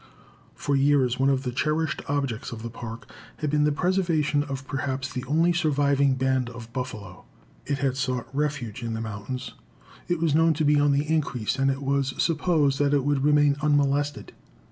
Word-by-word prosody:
For 140 - -1
years 135 -3 +3
one 135 +1 +3
of 135 -1 +1
the 125 - -2
cherished 155 +5 -1
objects 135 -6 -2
of 115 -1 -7
the 115 - -5
Park 115 0 -8 0.3
had 150 -2 -2
been 150 0 +3
the 150 - +3
preservation 165 -3 +1
of 135 -2 -5
perhaps 135 -1 -3
the 125 - -4
only 165 +6 +2
surviving 140 -4 +2
band 130 -1 0
of 115 -1 -11
buffalo. 105 -8 -6 0.4
It 140 0 0
had 135 -1 0
sought 130 -2 -2
refuge 140 -5 -2
in 115 -1 -3
the - - -4
mountains. 110 +3 -5 0.5
It 175 - 0
was 160 -2 +1
known 160 +1 +4
to 155 0 0
be 145 0 +4
on 145 0 +3
the 140 +2 +1
increase 135 -6 -1
and 135 0 +3
it 135 +1 -2
was 135 -1 0
supposed 155 -4 +1
that 145 0 +3
it 140 -2 +1
would 145 -2 +1
remain 145 -1 +4
unmolested. 145 -5 +1
140 Hz, 190 wpm, -25 LUFS, 130-150 Hz, 0.5 s, known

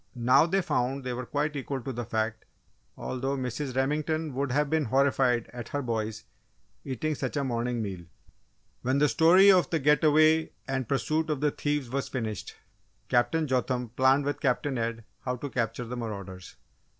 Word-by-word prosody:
Now, 125 +6 +4
they 190 +2 +1
found 135 -4 -1
they 125 -1 -3
were 125 0 -5
quite 150 +1 -1
equal 135 0 -3
to 135 +1 -5
the 120 0 -4
fact, 110 0 -2 0.5
although 135 +2 -3
Mrs. 130 +1 -4
Remington 150 +3 0
would 135 0 -1
have 145 +3 +2
been 155 0 +1
horrified 130 -1 +2
at 120 -1 -7
her 145 0 -2
boys 110 -2 -3 0.6
eating 140 +4 -2
such 150 - -3
a 140 - +1
morning 120 -2 -1
meal! 95 -4 -6 0.8
When 130 +2 +1
the 150 +1 +4
story 180 +7 +6
of 185 -2 +3
the 165 - +1
get 150 0 +3
away 155 +1 +4
and 130 -3 -2
pursuit 155 +3 0
of 150 -3 -1
the 150 +1 +1
thieves 145 -5 -2
was 135 0 -2
finished, 110 -6 -4 0.5
Captain 120 +7 +2
Jotham 125 -2 -1
planned 130 +4 +3
with 145 0 -2
Captain 135 0 0
Ed 115 0 -3 0.2
how 125 -1 -3
to 135 +2 -6
capture 115 0 -2
the 120 +2 -5
marauders. 100 -6 -7
130 Hz, 175 wpm, -28 LUFS, 120-150 Hz, 0.8 s, story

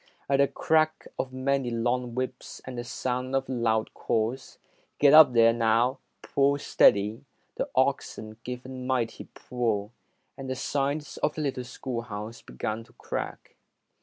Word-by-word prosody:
At 140 - +3
the 140 - +5
crack 155 +1 +1
of 130 - -2
many 130 0 0
long 120 +1 -1
whips 130 0 -4
and 130 - -6
the 120 - -4
sound 125 +1 -2
of 135 0 0
loud 115 -3 0
calls, 115 +4 -2 0.4
"Get 145 0 +6
up 155 -4 +9
there, 115 -1 +6
now! 115 +3 +2 0.2
Pull 140 +1 +2
steady", 105 -5 +3 0.3
the - - -2
oxen 110 0 0
gave 125 0 -6
a - - -8
mighty 130 -3 -2
pull, 115 -4 -2 0.4
and 135 -1 -7
the 130 - -1
sides 140 +3 -2
of 150 - 0
the 155 - -3
little 130 -3 -2
schoolhouse 115 -4 -6
began 110 - -4
to - - -23
crack. - - -6
125 Hz, 150 wpm, -27 LUFS, 115-135 Hz, 0.4 s, up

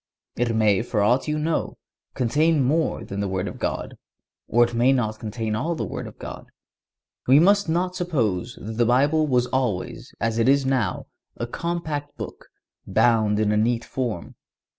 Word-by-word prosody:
It 120 -1 0
may, 105 -3 +3
for 110 -3 0
ought 125 +7 +2
you 150 0 0
know, 155 +1 -1 0.4
contain 145 +4 +2
more 155 +5 0
than 100 - -5
the 100 - -1
Word 95 -1 -2
of - - -7
God, - - -3 0.5
or 120 +1 +4
it 120 - -1
may 120 +3 +4
not 110 -5 0
contain 110 0 -3
all 160 +10 -1
the - - -3
Word - - -5
of - - -12
God. - - -8 0.8
We 135 +3 +7
must 200 +2 +4
not 180 +2 0
suppose 120 - -1
that 110 +1 -7
the 120 - +3
Bible 145 +6 +3
was 125 -3 +2
always, 125 -8 -2
as 115 +1 0
it 115 +3 +3
is 140 0 +4
now, 130 -8 0 0.3
a 120 - -2
compact 150 +1 -4
book, - - -8 0.4
bound 110 -3 +3
in 105 -1 +2
a 105 - +2
neat 115 +2 +1
form. 120 -10 -4
120 Hz, 180 wpm, -24 LUFS, 110-150 Hz, 0.8 s, We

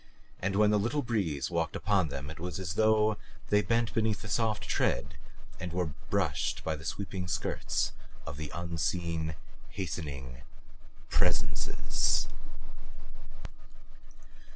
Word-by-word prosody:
And 95 +1 0
when 105 +1 +6
the 105 - +4
little 125 +8 +1
breeze 90 - 0
walked 85 -2 0
upon 95 -5 +3
them 70 0 -5
it 80 - -10
was 90 0 -3
as 90 -3 -2
though 110 +1 +4 0.3
they 105 0 +5
bent 115 +1 +1
beneath 110 -2 +1
the - - -5
soft 110 -1 +1
tread 70 +1 +1 0.5
and 90 -1 -4
were 85 -3 -1 0.2
brushed - - +1
by 80 - 0
the 75 - -9
sweeping 95 0 -3
skirts - - 0 0.3
of 70 - -6
unseen, 85 -1 -1 0.3
hastening 70 -9 -4 0.7
Presences. - - +2
90 Hz, 120 wpm, -31 LUFS, 80-105 Hz, 0.7 s, when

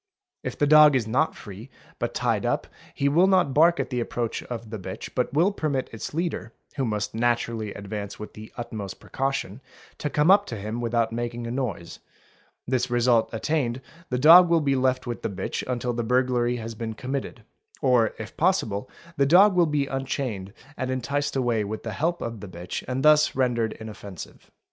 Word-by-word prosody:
If - - -5
the 145 - +3
dog 150 -1 +7
is 125 -4 +1
not 130 +9 +1
free 105 +5 -10 0.3
but - - -3
tied - - 0
up - - 0 0.3
he 140 - +1
will 170 +7 +4
not 185 -8 +3
bark 170 +4 +5
at - - -2
the 125 - -1
approach 120 -1 -2
of 115 -3 -7
the 110 - -5
bitch 95 0 -7
but 125 - 0
will 170 +8 +3
permit 150 -9 -2
its 110 - -6
leader, 160 -8 -3 0.2
who 135 -3 -1
must 105 -2 -2
naturally 115 -2 0
advance 100 0 -6
with 105 - -9
the 110 0 -11
utmost 110 -5 -6
precaution, 135 -4 -3 0.4
to 150 - -2
come 150 +5 +3
up 200 +1 +5
to 115 - -5
him 110 +3 -4
without 115 -1 0
making 120 0 -4
a 115 - -4
noise; 115 -10 -4 0.7
this 125 -1 0
result 120 -1 +3
attained 120 +1 -1 0.3
the 125 - -1
dog 165 +6 +8
will 170 -1 +4
be 140 -2 +1
left 130 0 +1
with 120 -1 -5
the - - -2
bitch 95 -1 -4
until 125 0 -1
the 120 - -2
burglary 125 0 +1
has 115 -1 -5
been 110 0 -5
committed, 135 +4 -5 0.4
or 125 -4 +3
if 110 - -8
possible 130 - 0 0.3
the 140 - +3
dog 190 +6 +7
will 175 -2 +4
be 150 -2 0
unchained 130 -7 -3 0.3
and 130 -1 -2
enticed 140 +3 -2
away 120 -5 +1
with 110 +2 -5
the 110 - -4
help 170 - -1
of 115 -2 -5
the 105 - -8
bitch 85 0 -6
and 130 +1 -2
thus 150 0 +5
rendered 120 -4 +1
inoffensive. 105 -5 -10
125 Hz, 190 wpm, -25 LUFS, 110-140 Hz, 0.7 s, dog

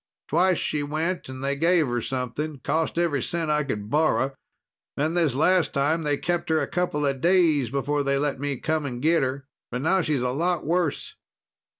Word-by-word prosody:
Twice 180 +3 +3
she 150 - -1
went 155 +3 -2
and 130 0 -7
they 140 +1 0
gave 165 +2 +3
her 120 -2 -2
something. 135 +4 -3
Cost 160 +1 -1
every 165 -6 +1
cent 165 +1 -1
I 150 0 +2
could 105 -7 -4
borrow. 150 -3 +2 0.6
Then 155 +3 0
this 165 -7 +1
last 180 +4 +2
time, 150 +4 +1
they 145 -2 0
kept 175 +2 -2
her 160 -1 +3
a - - 0
couple 175 -5 -1
days 155 -3 +3
before 140 +3 -1
they 140 0 +1
let 140 -1 -1
me 140 -1 -2
come 155 +2 -1
and 120 -2 -5
get 160 +5 +3
her. 135 +1 -2 0.2
But 125 +2 -4
now 190 +4 +3
she's 150 -6 0
a 125 - 0
lot 170 +5 -1
worse." 170 -1 -1
150 Hz, 195 wpm, -25 LUFS, 140-165 Hz, 0.6 s, Twice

